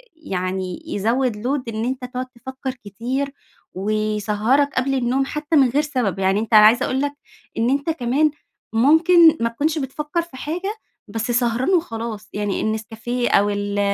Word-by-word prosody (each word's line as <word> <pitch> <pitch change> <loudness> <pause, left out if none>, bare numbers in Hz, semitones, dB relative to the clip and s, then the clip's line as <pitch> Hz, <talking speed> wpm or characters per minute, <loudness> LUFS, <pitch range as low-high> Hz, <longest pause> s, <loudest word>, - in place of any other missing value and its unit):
يعني 185 - -4
يزوِّد 235 +4 0
Load 275 0 0
إن 220 +1 -1
أنت 255 0 -3
تقعد 250 0 -4
تفكَّر 260 +2 -6
كتير، 255 +7 -3 0.4
ويسهَّرك 215 +6 +1
قبل 270 +1 +1
النوم 260 +1 +1
حتى 300 +3 -2
من 270 -4 +5
غير 280 +5 +2
سبب، 250 - -1
يعني 195 +1 +2
أنت 225 +1 -4
أنا 210 -1 +9
عايزة 235 +4 +5
أقول 265 +1 -1
لك 285 0 -1 0.4
إن 230 +2 +2
أنت 280 +4 0
كمان 295 +1 +1 0.4
ممكن 320 +6 +6
ما 230 - +2
تكونش 300 +7 -1
بتفكَّر 300 +4 -2
في 335 -6 -12
حاجة، 360 +9 -3 0.3
بس 225 +3 -3
سهران 240 +2 +1
وخلاص، 230 - -2
يعني 205 -1 -2
النسكافيه 225 +3 -2
أو 205 +1 +4
ال 205 0 -2
245 Hz, 160 wpm, -21 LUFS, 215-280 Hz, 0.4 s, أنا